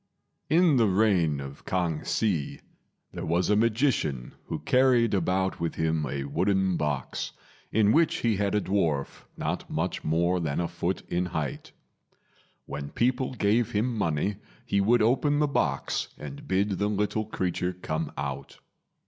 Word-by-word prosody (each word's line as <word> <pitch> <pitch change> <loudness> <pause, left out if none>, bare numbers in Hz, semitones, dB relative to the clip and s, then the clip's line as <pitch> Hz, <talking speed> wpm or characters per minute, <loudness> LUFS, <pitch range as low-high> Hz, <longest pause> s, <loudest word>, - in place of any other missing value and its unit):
In 160 -2 +5
the 115 -3 +4
reign 90 -7 +2
of 70 0 -8
K'ang 85 -4 -1
Hsi, 90 -10 -1 0.5
there - - -6
was 85 +4 +1
a - - +5
magician 110 - +1
who - - -3
carried 125 -3 +3
about 95 0 0
with 85 -1 -2
him 80 -2 0
a 70 +2 -3
wooden 95 +6 +1
box, 75 -4 -2 0.4
in 105 -1 +4
which 160 +3 +3
he 110 -4 +2
had 100 0 0
a 105 - +2
dwarf 85 -8 -1
not - - -3
much - - -2
more 85 +3 +1
than 75 -4 -1
a 85 - 0
foot - - -3
in 90 +1 0
height. 75 -5 -4 0.9
When 70 0 -6
people 125 +1 0
gave 110 +1 +1
him 115 +4 0
money 95 0 0 0.3
he 100 - +1
would 115 +3 +4
open 140 +5 +2
the 150 - +3
box 75 - -1
and 70 -1 -9
bid 95 +1 +1
the 105 - +2
little 105 +1 0
creature 90 -3 -2
come 80 -3 -3
out. 70 0 -5
95 Hz, 155 wpm, -27 LUFS, 80-110 Hz, 0.9 s, In